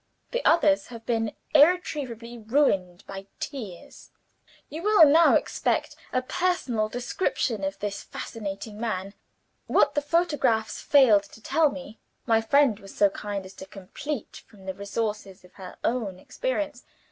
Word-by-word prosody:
The -, -, -2 dB
others 300 Hz, -3 st, +4 dB
have 230 Hz, -2 st, -11 dB
been 225 Hz, -2 st, -1 dB, 0.2 s
irretrievably 280 Hz, -7 st, +2 dB
ruined 205 Hz, -7 st, +1 dB
by 195 Hz, 0 st, -8 dB
tears.' 215 Hz, -, -8 dB, 0.6 s
"You 310 Hz, +3 st, -7 dB
will 415 Hz, -4 st, +7 dB
now 320 Hz, +3 st, +6 dB
expect -, -, 0 dB, 0.2 s
a 255 Hz, -, 0 dB
personal 260 Hz, -9 st, 0 dB
description 245 Hz, -, -2 dB
of 195 Hz, 0 st, -2 dB
this 205 Hz, -1 st, -4 dB
fascinating 210 Hz, -1 st, -7 dB
man. 200 Hz, -4 st, -3 dB, 0.5 s
What -, -, +3 dB
the 290 Hz, -, +1 dB
photographs 290 Hz, -8 st, +1 dB
failed 230 Hz, -8 st, +5 dB
to 200 Hz, -, -16 dB
tell 310 Hz, +7 st, +2 dB
me, 270 Hz, -5 st, -9 dB, 0.3 s
my 225 Hz, -2 st, +3 dB
friend 245 Hz, -2 st, +3 dB
was 195 Hz, -2 st, -13 dB
so 205 Hz, -1 st, +4 dB
kind 200 Hz, -1 st, -5 dB
as 190 Hz, -, -11 dB
to 190 Hz, -, -9 dB
complete 220 Hz, +8 st, -7 dB
from 205 Hz, -4 st, -17 dB
the 190 Hz, -, -3 dB
resources 200 Hz, -2 st, -4 dB
of 180 Hz, -, -20 dB
her 185 Hz, -2 st, -10 dB
own 225 Hz, -6 st, -1 dB
experience. 310 Hz, -, -3 dB
225 Hz, 145 wpm, -26 LUFS, 200-290 Hz, 0.6 s, will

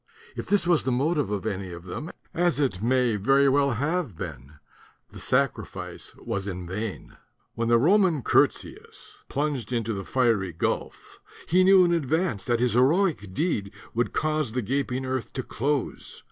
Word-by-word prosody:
If -, -, -6 dB
this 205 Hz, -4 st, +2 dB
was 170 Hz, -3 st, +3 dB
the 130 Hz, -, -1 dB
motive 145 Hz, -, +1 dB
of 105 Hz, -1 st, -3 dB
any 95 Hz, -3 st, -3 dB
of 85 Hz, 0 st, -9 dB
them, 150 Hz, -, -6 dB, 0.2 s
as 175 Hz, -3 st, +1 dB
it 125 Hz, -10 st, 0 dB
may 125 Hz, -1 st, +2 dB
very 135 Hz, +7 st, +4 dB
well 140 Hz, 0 st, +3 dB
have 145 Hz, -, -2 dB
been, 70 Hz, -7 st, -7 dB, 0.6 s
the -, -, -10 dB
sacrifice -, -, -2 dB
was 100 Hz, 0 st, -4 dB
in 90 Hz, -2 st, -5 dB
vain. 100 Hz, +4 st, -6 dB, 0.4 s
When 115 Hz, 0 st, -2 dB
the 120 Hz, 0 st, +5 dB
Roman 170 Hz, -, +3 dB
Curtius -, -, -1 dB
plunged 140 Hz, -6 st, -2 dB
into 115 Hz, -2 st, -1 dB
the 95 Hz, -1 st, -4 dB
fiery 110 Hz, -7 st, +1 dB
gulf, 80 Hz, -, -3 dB, 0.3 s
he 185 Hz, +3 st, +4 dB
knew 190 Hz, -1 st, +7 dB
in 175 Hz, -, +2 dB
advance 160 Hz, -, 0 dB
that 120 Hz, -1 st, +1 dB
his 125 Hz, 0 st, +2 dB
heroic 130 Hz, -, +2 dB
deed 105 Hz, -, -1 dB, 0.2 s
would 120 Hz, +1 st, 0 dB
cause 155 Hz, -6 st, -1 dB
the 125 Hz, -1 st, -1 dB
gaping 130 Hz, +2 st, -1 dB
earth 130 Hz, -3 st, -3 dB
to 130 Hz, -, -3 dB
close. 140 Hz, +3 st, -3 dB
125 Hz, 165 wpm, -26 LUFS, 105-155 Hz, 0.6 s, knew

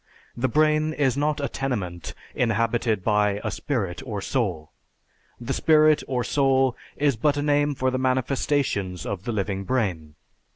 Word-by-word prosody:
The 120 Hz, +2 st, 0 dB
brain 155 Hz, +2 st, +2 dB
is 135 Hz, -5 st, +1 dB
not 150 Hz, +1 st, 0 dB
a 140 Hz, -, -1 dB
tenement 100 Hz, -13 st, -4 dB, 0.2 s
inhabited 115 Hz, -3 st, 0 dB
by 105 Hz, -1 st, +2 dB
a -, -, -2 dB
spirit 100 Hz, -11 st, -3 dB
or 110 Hz, -6 st, -4 dB
soul. 95 Hz, -, -2 dB, 0.7 s
The 120 Hz, -, -3 dB
spirit 155 Hz, -1 st, +4 dB
or 125 Hz, -2 st, -1 dB
soul 135 Hz, -1 st, +2 dB, 0.2 s
is 145 Hz, -3 st, +2 dB
but 145 Hz, +6 st, +1 dB
a 145 Hz, -, -1 dB
name 145 Hz, 0 st, +2 dB
for 130 Hz, 0 st, 0 dB
the 130 Hz, -, -1 dB
manifestations 130 Hz, -, 0 dB
of 100 Hz, -2 st, -4 dB
the 120 Hz, -, -1 dB
living 100 Hz, -2 st, -2 dB
brain. 95 Hz, -11 st, -2 dB
125 Hz, 155 wpm, -24 LUFS, 105-145 Hz, 0.7 s, spirit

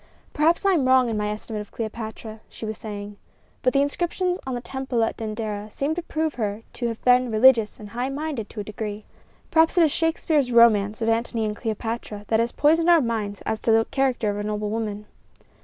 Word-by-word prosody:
"Perhaps 330 Hz, +5 st, +2 dB
I 395 Hz, -, +5 dB
am 285 Hz, -7 st, +2 dB
wrong 260 Hz, -2 st, +5 dB
in 220 Hz, -, -2 dB
my 210 Hz, 0 st, -1 dB
estimate 210 Hz, 0 st, -5 dB
of 210 Hz, -, -10 dB
Cleopatra," 220 Hz, 0 st, -6 dB
she -, -, -8 dB
was 215 Hz, 0 st, -5 dB
saying; 205 Hz, -1 st, -7 dB, 0.4 s
"but 255 Hz, -, +2 dB
the 275 Hz, +1 st, +3 dB
inscriptions 355 Hz, +5 st, -1 dB
on 260 Hz, -, -2 dB
the -, -, -2 dB
temple 255 Hz, -1 st, -2 dB
at 225 Hz, -, -1 dB
Dendera 215 Hz, -1 st, -4 dB
seem 280 Hz, +8 st, -2 dB
to 350 Hz, -, -3 dB
prove 315 Hz, -2 st, -2 dB
her 210 Hz, +1 st, -2 dB
to 240 Hz, -, -2 dB
have 230 Hz, -1 st, -4 dB
been 250 Hz, 0 st, +4 dB
religious 225 Hz, -1 st, +4 dB
and 210 Hz, -1 st, -9 dB
high 245 Hz, +4 st, -3 dB
minded 280 Hz, -5 st, -4 dB
to 220 Hz, -, -8 dB
a -, -, -5 dB
degree. 210 Hz, 0 st, -6 dB, 0.5 s
Perhaps 325 Hz, +2 st, +4 dB
it 345 Hz, -, +7 dB
is 310 Hz, -, +3 dB
Shakespeare's 315 Hz, -4 st, +1 dB
romance 220 Hz, -2 st, +4 dB
of 225 Hz, -, +1 dB
Antony 230 Hz, 0 st, 0 dB
and 210 Hz, 0 st, -2 dB
Cleopatra 220 Hz, -2 st, -4 dB
that 220 Hz, -, +3 dB
has 235 Hz, +1 st, +1 dB
poisoned 325 Hz, +3 st, +3 dB
our 340 Hz, -1 st, +7 dB
minds 220 Hz, -6 st, -2 dB
as 220 Hz, -, -1 dB
to 225 Hz, -, +1 dB
the 225 Hz, 0 st, +4 dB
character 260 Hz, -6 st, +1 dB
of 205 Hz, -, -4 dB
a 205 Hz, -, -3 dB
noble 210 Hz, 0 st, -2 dB
woman." 210 Hz, -2 st, -3 dB
230 Hz, 215 wpm, -24 LUFS, 215-270 Hz, 0.5 s, it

